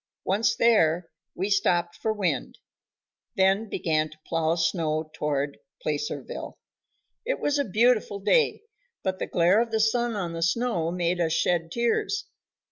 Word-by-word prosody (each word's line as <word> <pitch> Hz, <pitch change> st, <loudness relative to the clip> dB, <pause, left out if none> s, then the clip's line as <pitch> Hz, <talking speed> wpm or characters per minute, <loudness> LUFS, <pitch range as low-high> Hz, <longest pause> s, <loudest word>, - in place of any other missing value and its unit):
Once 220 Hz, +4 st, +2 dB
there, 175 Hz, -8 st, +3 dB, 0.2 s
we 190 Hz, -, -1 dB
stopped 175 Hz, -4 st, +1 dB
for 220 Hz, -, -1 dB
wind, 185 Hz, -11 st, -2 dB, 0.8 s
then 195 Hz, +3 st, +2 dB
began 155 Hz, -4 st, 0 dB
to 155 Hz, -, -16 dB
plow 165 Hz, 0 st, 0 dB
snow 160 Hz, -2 st, -1 dB
toward 145 Hz, -1 st, -2 dB, 0.2 s
Placerville. 450 Hz, -2 st, -4 dB, 0.7 s
It -, -, -2 dB
was 290 Hz, 0 st, 0 dB
a 285 Hz, -, +1 dB
beautiful 220 Hz, 0 st, +2 dB
day, 460 Hz, -, +2 dB, 0.4 s
but 190 Hz, -1 st, -2 dB
the -, -, -2 dB
glare 180 Hz, +5 st, +3 dB
of 235 Hz, -, -1 dB
the 220 Hz, -1 st, 0 dB
sun 235 Hz, +1 st, +1 dB
on 175 Hz, -4 st, -3 dB
the 165 Hz, -, -5 dB
snow 170 Hz, -1 st, +1 dB
made 175 Hz, 0 st, 0 dB
us 160 Hz, -1 st, +1 dB
shed 165 Hz, -1 st, +1 dB
tears. 235 Hz, -, 0 dB
185 Hz, 145 wpm, -26 LUFS, 165-225 Hz, 0.8 s, there